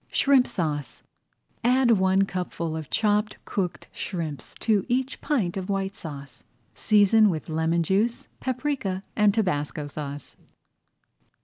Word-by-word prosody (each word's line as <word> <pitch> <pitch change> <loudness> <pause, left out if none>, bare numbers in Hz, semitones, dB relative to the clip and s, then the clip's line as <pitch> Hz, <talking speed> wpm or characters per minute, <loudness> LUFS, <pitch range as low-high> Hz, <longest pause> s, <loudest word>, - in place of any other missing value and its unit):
SHRIMP 275 -2 +4
SAUCE 150 -6 -3 0.6
Add 250 0 +4
one 190 -2 +4
cupful 180 -4 -3
of 160 -2 -6
chopped 210 0 +1
cooked 180 -6 -3
shrimps 160 -8 -5
to 215 -4 +2
each 260 +3 -1
pint 210 - 0
of 190 +1 -4
White 195 0 -1
Sauce. 140 -5 -9 0.3
Season 210 0 +5
with 160 -2 -3
lemon 160 +2 +1
juice, 210 +7 0
paprika, 255 -7 -2
and 210 -1 +5
tabasco 155 -8 -1
sauce. 145 0 -7
190 Hz, 120 wpm, -26 LUFS, 160-220 Hz, 0.6 s, Season